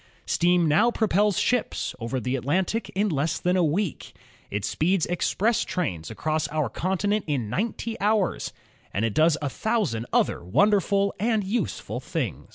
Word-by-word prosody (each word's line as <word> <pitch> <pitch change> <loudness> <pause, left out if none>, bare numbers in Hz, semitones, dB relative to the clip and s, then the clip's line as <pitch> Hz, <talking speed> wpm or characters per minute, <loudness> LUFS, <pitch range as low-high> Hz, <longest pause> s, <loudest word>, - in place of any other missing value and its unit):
Steam 175 -1 +3
now 155 +10 +4
propels 210 -4 +2
ships 250 -2 0
over 120 +3 -2
the 125 +2 -1
At 130 - -3
lantic 185 - 0
in 205 +2 +2
less 155 0 0
than 180 +1 +1
a 180 - +3
week. 170 +3 -1 0.4
It 100 0 -2
speeds 180 +2 +1
express 215 +6 +1
trains 90 - -3
across 155 +6 -1
our 150 -4 -1
continent 195 - -1
in 125 -8 -1
ninety 225 - -2
hours, 205 -2 +1 0.4
and 105 +3 0
it 110 - -1
does 155 +3 +4
a 145 - 0
thousand 185 - -1
other - - +1
wonderful 200 - +2
and 220 0 +1
useful 210 +6 -2
things. - - -4
180 Hz, 160 wpm, -25 LUFS, 145-205 Hz, 0.4 s, now